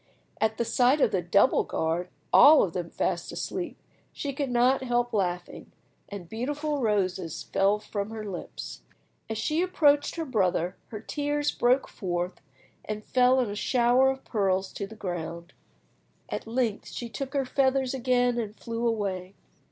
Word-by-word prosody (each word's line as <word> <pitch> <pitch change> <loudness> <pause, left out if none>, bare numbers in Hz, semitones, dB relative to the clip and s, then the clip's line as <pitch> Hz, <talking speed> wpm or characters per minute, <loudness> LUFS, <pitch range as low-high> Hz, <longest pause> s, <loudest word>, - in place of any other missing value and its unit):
At 220 0 +1
the 235 - 0
sight 250 +5 +3
of 225 - +3
the 185 - +1
double 200 +8 +3
guard, 165 +3 -2 0.2
all 305 +1 +8
of 175 - -2
them 175 -2 -3
fast 175 0 -2
asleep, - - -4 0.3
she 280 -1 -4
could 275 0 -2
not 250 +2 +3
help 245 -1 0
laughing, 180 -4 -2 0.4
and 200 -4 -7
beautiful 290 - -2
roses 185 -7 -1
fell 200 +2 +2
from 205 -1 -4
her 220 -1 -6
lips. 190 -4 -7 0.5
As 220 - -3
she 305 +8 0
approached 290 -5 +3
her 330 -2 -3
brother 185 - 0
her 215 - -7
tears 290 +3 -1
broke 250 +3 +2
forth 180 -1 -4 0.4
and 215 0 -5
fell 255 +1 +4
in 230 -5 -2
a - - -5
shower 245 +4 +3
of 265 0 -4
pearls 190 -3 0
to 200 - -4
the 220 - -11
ground. 170 -4 -5 0.8
At - - -4
length 230 -2 -1
she 240 - -6
took 275 +4 -6
her 275 -1 +1
feathers 265 0 +1
again 245 -1 +1
and 215 -2 -5
flew 230 0 -2
away. 195 -4 -2
225 Hz, 160 wpm, -27 LUFS, 190-260 Hz, 0.8 s, all